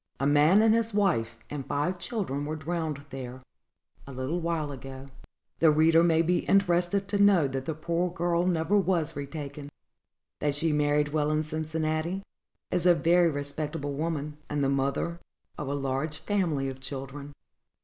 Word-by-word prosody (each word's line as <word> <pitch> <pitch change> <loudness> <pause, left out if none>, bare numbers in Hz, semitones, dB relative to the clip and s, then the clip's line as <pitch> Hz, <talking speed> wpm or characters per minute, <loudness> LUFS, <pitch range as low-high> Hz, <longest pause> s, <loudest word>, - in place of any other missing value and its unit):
A 140 - 0
man 150 +8 +5
and 220 -1 +5
his 225 -2 0
wife, 120 - +1
and 145 -2 -5
five 145 +7 -1
children, 175 - -3
were 155 +2 -3
drowned 155 -2 -3
there, 130 -1 -7 0.7
a - - -8
little 130 +6 -2
while 165 -3 -1
ago." 135 0 -8 0.5
The 165 - +6
reader 160 +2 +5
may 165 -1 +4
be 175 +2 +2
interested 195 0 +2
to 205 -1 +1
know 195 -7 +5
that 135 0 -4
the 160 - -3
poor 170 +3 -1
girl 175 0 0
never 175 +2 +1
was 180 -5 0
retaken; 145 0 -6 0.7
that 145 -1 0
she 160 +1 +1
married 150 0 +2
well 150 0 0
in 155 0 +1
Cincinnati, 155 +3 -2 0.5
is 180 0 +1
a 175 - +7
very 170 +1 +4
respectable 145 0 -4
woman, 150 -1 -3
and 145 -1 0
the 135 - +2
mother 140 +5 -1 0.4
of 145 - -5
a 140 - -1
large 140 +3 -2
family 165 -9 0
of 135 0 -6
children. 140 +2 -6
155 Hz, 165 wpm, -28 LUFS, 140-170 Hz, 0.7 s, a